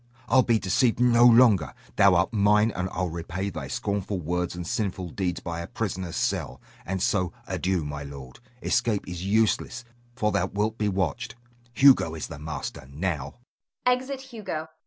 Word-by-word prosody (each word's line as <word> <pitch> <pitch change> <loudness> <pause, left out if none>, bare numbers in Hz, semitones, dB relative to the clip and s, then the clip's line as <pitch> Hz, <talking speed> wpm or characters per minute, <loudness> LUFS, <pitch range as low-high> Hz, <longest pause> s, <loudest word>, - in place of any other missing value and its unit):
I'll 130 - +5
be 115 -2 +2
deceived 115 +5 +1
no 120 -1 +5
longer. 115 - +5 0.2
Thou 100 -2 +6
art 85 +6 +1
mine, 105 +1 +4
and 90 +1 -2
I'll 90 -1 -2
repay 90 +4 -4
thy 80 -6 -6
scornful 100 +2 -2
words 90 +2 -2
and 90 -1 -5
sinful 95 -4 -2
deeds 90 -5 -2
by 85 -1 -5
a 85 - -5
prisoner's 95 -6 -4
cell. - - -1 0.3
And 95 0 -1
so, 90 -5 +1
adieu, 95 -4 -1
my 75 0 -5
lord. 70 -2 -10 0.2
Escape 115 -4 0
is 90 -1 -5
useless, 110 +3 +1 0.3
for 105 -4 +1
thou 90 - +1
wilt 105 +3 -2
be 105 -1 +1
watched. 95 +2 -2 0.4
Hugo 130 - +5
is 80 - -4
the - - -8
master 75 -3 -6
now! 75 -2 -3
95 Hz, 155 wpm, -26 LUFS, 85-105 Hz, 0.4 s, Thou